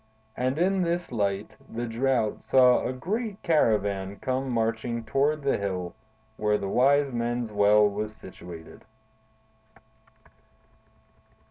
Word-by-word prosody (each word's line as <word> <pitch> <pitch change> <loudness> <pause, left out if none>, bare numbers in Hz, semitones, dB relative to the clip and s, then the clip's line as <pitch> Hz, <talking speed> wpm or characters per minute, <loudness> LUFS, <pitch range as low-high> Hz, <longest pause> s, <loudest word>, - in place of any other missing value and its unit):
And 130 +3 -1
in 190 +3 +2
this 175 0 -1
light 100 -3 -1 0.2
the 120 +1 -4
Drought 120 -1 0
saw 125 -1 +4
a - - -2
great 205 - -3
caravan 100 - +1
come 130 +5 -2
marching 115 0 -1
toward 145 +4 0
the 140 - +1
hill 90 -3 -3 0.4
where 105 0 +1
the 100 - -4
Wise 140 +6 +3
Men's 120 -1 -2
Well 105 0 +5
was 105 +1 -4
situated. 85 -4 -11
115 Hz, 115 wpm, -26 LUFS, 105-135 Hz, 0.4 s, Well